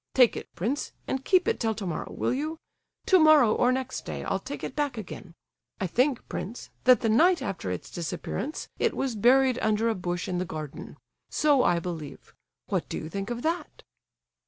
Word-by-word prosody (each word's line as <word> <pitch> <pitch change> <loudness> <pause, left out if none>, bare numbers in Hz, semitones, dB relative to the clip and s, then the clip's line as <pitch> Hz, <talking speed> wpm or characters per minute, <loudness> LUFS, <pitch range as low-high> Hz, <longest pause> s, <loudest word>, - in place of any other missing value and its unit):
Take 250 -3 +6
it, - - -7
prince, 235 - -2
and 265 0 -2
keep 370 +4 +3
it 455 - +1
till 225 -2 0
tomorrow, 185 -6 -4
will - - -1
you? 305 +5 -3 0.5
Tomorrow 310 - +6
or 245 - +3
next 260 0 -3
day - - -5
I'll - - -1
take - - -7
it - - -5
back 290 -5 -1
again. 185 -4 -8 0.4
I 190 - -1
think, 250 - +1
prince, 225 +6 -6
that 255 -1 +6
the 230 - +1
night 340 +11 +4
after 180 - -4
its 90 -1 -5
disappearance 180 - -4
it - - +1
was 265 -4 -1
buried 255 +3 +4
under 220 +1 +2
a - - +2
bush 175 -3 -3
in 180 -1 -1
the - - 0
garden. 155 -5 -7 0.3
So 290 -3 +3
I 175 - +3
believe—what 165 -4 -6
do - - -3
you 155 - -6
think 195 +5 -4
of 240 0 -4
that?" 335 +2 -3
235 Hz, 185 wpm, -27 LUFS, 180-275 Hz, 0.5 s, Take